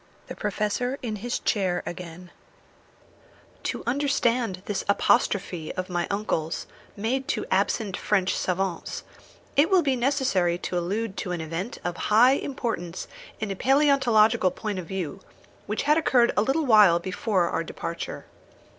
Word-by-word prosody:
THE - - -8
PROFESSOR 215 +5 -1
IN 220 -3 -3
HIS 240 +4 -2
CHAIR 190 -5 0
AGAIN 175 0 -8 1.3
To - - -3
understand 240 -7 0
this 205 - -2
apostrophe 185 -4 +1
of 185 0 -4
my 175 -1 -1
uncle's, 185 -6 -2 0.3
made 255 +6 -1
to - - -1
absent 195 +1 +1
French 195 -3 +1
savants, 185 -1 -2 0.5
it 290 +5 +4
will 375 -3 +4
be 270 -3 +2
necessary 240 -10 +1
to 180 0 -2
allude 200 +4 -3
to 180 - -3
an 175 - -3
event 165 +7 -4
of 175 -1 -3
high 230 +5 +7
importance 230 -11 -3 0.3
in 215 -2 -3
a - - -2
palæontological 240 -7 +3
point 210 -4 -3
of 175 - -7
view, 190 -1 -4 0.5
which 210 - -1
had 300 +3 +4
occurred 245 -6 +3
a - - +3
little 275 +8 +1
while 210 -8 +7
before 185 0 0
our 165 - -1
departure. 165 0 -6
205 Hz, 145 wpm, -26 LUFS, 180-245 Hz, 1.3 s, high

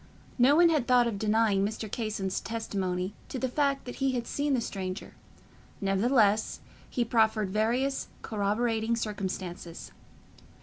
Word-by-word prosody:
No 260 +4 +6
one 340 +1 +6
had 300 -7 +1
thought 250 -1 +5
of 220 -4 -2
denying 215 -2 +2
Mr. 215 +2 -3
Casson's 210 -3 -2
testimony 195 -4 -2 0.2
to - - -4
the 260 - 0
fact 275 +1 0
that 245 - -7
he 270 -1 +1
had 240 -2 -2
seen 285 +1 0
the - - +1
stranger; 195 -4 -5 0.7
nevertheless, 210 +2 +2 0.3
he 240 - 0
proffered 220 -3 +2
various 240 +6 0 0.2
corroborating 220 +2 0
circumstances. 185 - -5
220 Hz, 135 wpm, -29 LUFS, 200-245 Hz, 0.7 s, No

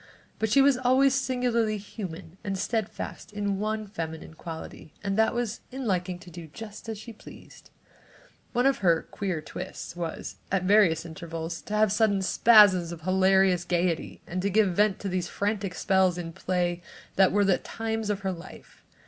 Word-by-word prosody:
But 220 - 0
she 275 +5 +5
was 275 -2 +4
always 260 +2 +4
singularly 245 -5 +1
human 190 -4 -8
and 195 -1 -2
steadfast 220 +1 -3
in 205 -2 -2
one 215 +1 -2
feminine 160 -6 -6
quality 160 -1 -9
and 195 -1 -1
that 220 +1 +3
was 235 -2 -2
in 265 0 -5
liking 180 -3 -1
to 180 0 -14
do 170 -1 -9
just 215 +7 -9
as 220 - -4
she 225 +3 -9
pleased. 215 - -14 0.8
One 245 +1 +1
of 275 0 +3
her 170 -4 +3
"queer 185 -6 -2
twists" 180 +3 -7
was, 170 -2 -5
at 190 -1 +1
various 185 -5 +4
intervals, 165 0 -6
to 210 - -5
have 215 -1 +3
sudden 205 -2 +2
spasms 190 -5 +6
of 170 -2 -8
hilarious 190 0 +3
gaiety 175 -1 -1
and 180 +2 -3
to 200 - 0
give 200 -2 +3
vent 205 -1 +3
to 200 - -3
these 180 -2 -1
frantic 200 -2 -2
spells 190 -3 +2
in 165 -1 -5
play 175 -1 -1 0.3
that 190 -1 +5
were 205 0 +3
the 190 -2 +3
times 225 -1 -3
of 200 -1 -1
her 190 -1 -1
life. 175 0 -12
195 Hz, 175 wpm, -27 LUFS, 175-215 Hz, 0.8 s, spasms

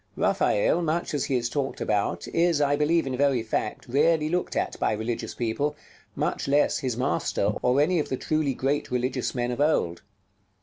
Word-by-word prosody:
Raphael, 130 +11 +2
much 165 0 -1
as 145 - 0
he 135 - -1
is 120 -1 0
talked 135 +2 -3
about, 100 -5 -1
is, 170 -2 +2
I 145 -1 +3
believe 155 +2 +2
in 130 -1 -2
very 135 -3 +2
fact, 110 -1 -3
rarely 155 +4 +2
looked 180 +2 -1
at - - -2
by - - +1
religious 110 +2 -3
people; 140 +6 -1 0.4
much - - -2
less 145 +1 +3
his 125 -3 -2
master, 100 -3 0
or 125 +2 +2
any 170 +4 +3
of 150 - -2
the 130 - -1
truly 155 -3 0
great 140 +3 -1
religious 125 +1 -1
men 120 0 -1
of 125 - -3
old. 115 - +1
135 Hz, 185 wpm, -26 LUFS, 120-150 Hz, 0.4 s, I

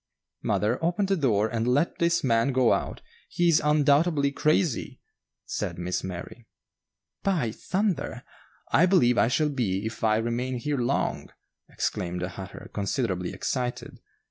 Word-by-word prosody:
"Mother, 115 +8 0
open 180 +5 +1
the 195 0 +1
door 110 - +2
and 115 0 -2
let 145 +7 +1
this 170 0 +2
man 115 +1 +2
go 130 -2 +4
out; - - -3 0.3
he 175 - +1
is 160 - +4
undoubtedly 150 0 +3
crazy," 155 0 0 0.5
said - - -3
Miss 90 +1 -2
Mary. 95 +5 -7 0.7
"By 165 - 0
thunder! 190 - -2 0.5
I 180 - +5
believe 125 -11 +4
I - - +4
shall 150 +5 +1
be 105 -8 -1
if 110 +1 -6
I 110 -1 +3
remain 120 +3 -2
here 145 +3 -2
long," 125 +3 -1 0.4
exclaimed 90 0 -3
the 90 - -2
hatter, 95 +1 -9
considerably 100 -3 -1
excited. 125 -2 -3
125 Hz, 145 wpm, -26 LUFS, 110-155 Hz, 0.7 s, I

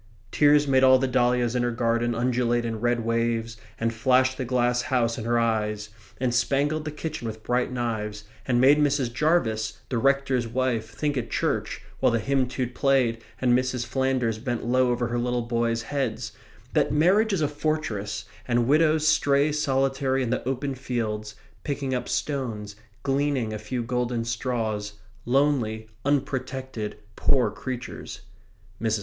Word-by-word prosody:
Tears 145 0 +4
made 130 -1 +4
all 130 0 +7
the 135 +1 0
dahlias 125 -1 +2
in 125 - +2
her 120 - +1
garden 115 0 0
undulate 120 0 +1
in 115 -1 -3
red 120 -1 +1
waves 115 0 0 0.2
and 115 0 0
flashed 130 +2 +3
the 130 - -3
glass 125 0 +1
house 120 -3 +1
in 110 - -5
her 120 0 +2
eyes, 105 -2 0 0.3
and 125 -1 0
spangled 145 +5 +1
the 155 - -3
kitchen 150 -4 -5
with 110 0 -7
bright 125 +1 0
knives, 110 -4 -3 0.2
and 120 -2 +2
made 140 +4 +6
Mrs. 140 -5 +1
Jarvis, 115 -7 +1
the 125 - 0
rector's 135 -2 +2
wife, 115 -2 -1
think 140 +6 -2
at 120 -2 -3
church, - - -1 0.2
while - - +3
the 115 - +2
hymn 135 +3 +1
tune 125 -1 -3
played 125 -4 +1 0.2
and 125 -1 +3
Mrs. 125 -1 0
Flanders 125 -2 0
bent 120 0 -3
low 130 +1 +3
over 120 -1 0
her 120 0 -1
little 125 0 0
boys' 115 -1 0
heads, 140 +1 -2 0.4
that - - +2
marriage 190 +9 +3
is 190 -5 0
a 150 - +3
fortress 110 -9 -2 0.2
and 120 -1 +2
widows 155 +1 +3
stray 145 -1 +3
solitary 135 -2 +1
in 120 - -2
the 125 - -1
open 135 +1 -2
fields, 110 -5 -3 0.3
picking 140 -2 -2
up 125 - -2
stones, 115 -8 -3 0.3
gleaning 135 -5 0
a 110 - -4
few 125 +2 -3
golden 120 -1 -1
straws, 115 -3 -2 0.3
lonely, 120 -5 +1 0.2
unprotected, 130 -5 -2 0.2
poor 130 -3 +2
creatures. 125 -2 -6 0.6
Mrs. 110 -1 +1
125 Hz, 160 wpm, -25 LUFS, 115-135 Hz, 0.6 s, all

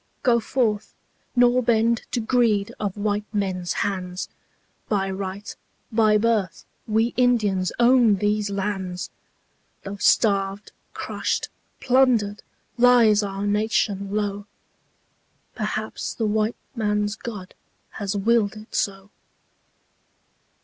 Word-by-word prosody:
Go 240 -2 +4
forth, 220 -3 -1 0.4
nor 245 0 +4
bend 230 -1 +1
to 245 - -1
greed 220 -3 +1
of 205 -2 -3
white 205 0 -2
men's 190 -4 -2
hands, 185 -2 -4 0.6
By 195 -2 0
right, 195 +2 -5 0.4
by 215 -1 +4
birth 210 -5 0 0.2
we 225 +2 +1
Indians 215 -7 +2
own 240 -3 +5
these 210 +1 0
lands, 190 -2 -3 0.7
Though 200 +1 -6
starved, 200 -1 +2 0.2
crushed, - - -2 0.3
plundered, 245 -5 +2 0.4
lies 235 -4 +6
our 200 0 -3
nation 205 -1 0
low... 205 -1 -2 1.1
Perhaps 215 0 -4
the 225 - -1
white 215 +2 0 0.2
man's 210 -2 0
God 210 -5 -8 0.4
has 205 0 -3
willed 220 0 +2
it 215 +2 -13
so. 195 0 -2
210 Hz, 105 wpm, -23 LUFS, 200-230 Hz, 1.1 s, lies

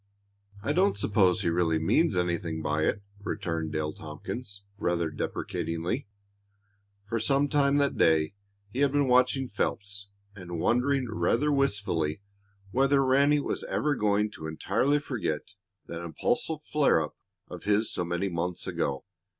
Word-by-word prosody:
"I 145 - +1
don't 185 - +3
suppose 100 -3 +3
he - - +2
really 85 -1 +2
means 90 - +2
anything 85 -2 -1
by 75 +1 +1
it," 100 - 0 0.2
returned 85 -6 -3
Dale 75 -1 -2
Tompkins, 100 +7 -7 0.2
rather 85 -3 0
deprecatingly. 85 - -3 1.0
For 115 +2 -1
some 135 +5 +2
time 140 -1 +3
that 140 -1 +1
day 80 +1 +4 0.4
he 125 - -4
had 140 -1 +4
been 145 -1 +3
watching 130 +1 +3
Phelps 100 -2 -3 0.3
and 90 -4 -6
wondering 125 +6 +2
rather 115 +6 +1
wistfully 100 - 0 0.5
whether 135 +2 +3
Ranny 140 +3 +4
was - - -3
ever 150 0 0
going 105 -3 +1
to 80 -6 -7
entirely 135 - +1
forget 110 - -3 0.3
that 85 0 -6
impulsive 160 - -1
flare 150 - +3
up 75 -1 -4 0.3
of - - -9
his 105 +2 +2
so - - -1
many 85 +3 -1
months 90 0 -2
ago. 70 -1 -2
100 Hz, 140 wpm, -28 LUFS, 85-135 Hz, 1.0 s, day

